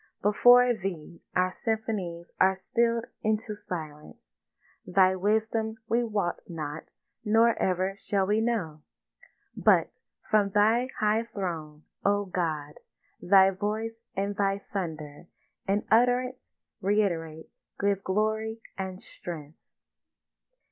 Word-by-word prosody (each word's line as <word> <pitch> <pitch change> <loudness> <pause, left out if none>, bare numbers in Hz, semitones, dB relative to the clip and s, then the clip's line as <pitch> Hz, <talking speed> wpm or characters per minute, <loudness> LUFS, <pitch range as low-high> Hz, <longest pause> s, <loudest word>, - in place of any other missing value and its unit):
Before 245 +4 +6
Thee 180 -6 -6
our 185 0 +2
symphonies 200 -6 -3
are 190 0 +5
still'd 230 +4 0 0.2
into 215 0 -1
silence; 155 -7 -7 0.7
Thy 185 0 +3
wisdom 220 +3 0
we 235 +2 +2
wot 210 -6 -2
not 155 -2 -5 0.4
nor 225 +2 +4
ever 185 +1 0
shall 195 -1 0
we 210 +3 +2
know; 190 -10 -2 0.7
But - - +3 0.3
from 210 -2 +3
Thy 225 +4 +4
high 215 +2 +2
throne, 160 -6 -5 0.2
O 205 0 +2
God, 155 -5 -3 0.4
Thy 190 +1 +6
voice 220 +4 -4
and 200 +1 -1
Thy 195 0 0
thunder 160 -4 -5 0.4
In 200 +2 +1
utterance 250 +2 +2 0.3
reïterate 170 -6 0 0.3
give 200 -1 +1
glory 220 +3 -1 0.2
and 190 -1 -4
strength. 160 -6 -9
200 Hz, 105 wpm, -28 LUFS, 175-220 Hz, 0.7 s, Before